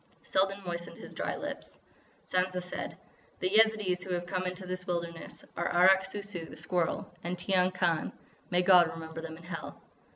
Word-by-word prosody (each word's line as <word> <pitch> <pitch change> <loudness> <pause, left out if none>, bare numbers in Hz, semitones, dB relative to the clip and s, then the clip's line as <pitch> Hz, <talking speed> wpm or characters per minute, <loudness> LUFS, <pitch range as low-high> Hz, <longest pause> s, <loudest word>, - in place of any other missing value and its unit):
Selden 195 +1 +2
moistened 170 -1 -5
his - - -10
dry - - -2
lips. - - -6 0.5
Sansa 185 0 +1
said: 180 - -5 0.4
"The 185 - +1
Yezidees 215 -4 +5
who - - -9
have 175 0 -3
come 185 +1 -2
into 180 +1 -5
this 185 +1 -5
wilderness 170 -1 -4
are 175 - 0
Arrak 190 +2 +6
Sou 200 +1 -4
Sou, 195 -4 -5
the - - -10
Squirrel; 175 -3 -1
and 175 +1 -2
Tiyang 185 0 +3
Khan.... 175 -3 +1 0.4
May 180 0 +3
God 180 -2 +8
remember 160 0 -7
them 160 -1 -7
in 170 - -14
Hell!" 170 -1 -6
180 Hz, 175 wpm, -31 LUFS, 175-190 Hz, 0.5 s, God